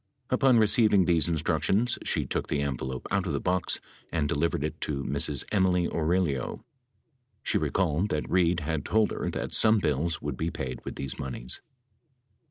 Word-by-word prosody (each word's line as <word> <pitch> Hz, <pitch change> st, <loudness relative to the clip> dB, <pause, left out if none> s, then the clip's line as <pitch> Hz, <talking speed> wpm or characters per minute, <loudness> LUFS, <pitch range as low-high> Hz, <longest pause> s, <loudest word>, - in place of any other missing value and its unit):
Upon 130 Hz, -1 st, +4 dB
receiving 105 Hz, -3 st, +4 dB
these 85 Hz, -2 st, +3 dB
instructions, 85 Hz, -, +1 dB
she -, -, 0 dB
took -, -, -2 dB
the 70 Hz, -, -1 dB
envelope 65 Hz, -2 st, -4 dB
out, 100 Hz, -1 st, 0 dB
of 80 Hz, -, -2 dB
the 70 Hz, -, 0 dB
box 90 Hz, +1 st, 0 dB, 0.3 s
and 80 Hz, -3 st, 0 dB
delivered 80 Hz, -1 st, 0 dB
it 75 Hz, -, -4 dB
to 70 Hz, -2 st, -2 dB
Ms. 70 Hz, 0 st, -1 dB
Emily 90 Hz, -3 st, +2 dB
Aurelio. 80 Hz, -5 st, -1 dB, 0.8 s
She -, -, +1 dB
recalled 90 Hz, +1 st, 0 dB
that 75 Hz, -4 st, -2 dB
Reid 90 Hz, -1 st, +2 dB
had 75 Hz, -1 st, -2 dB
told 110 Hz, -1 st, +2 dB
her -, -, -3 dB
that -, -, -4 dB
some 110 Hz, 0 st, +5 dB
bills 80 Hz, -2 st, 0 dB
would 70 Hz, -3 st, -4 dB
be 80 Hz, -, -1 dB
paid 65 Hz, -6 st, -5 dB
with -, -, -6 dB
these 70 Hz, -, -3 dB
moneys. 65 Hz, -2 st, -2 dB
85 Hz, 170 wpm, -28 LUFS, 70-95 Hz, 0.8 s, some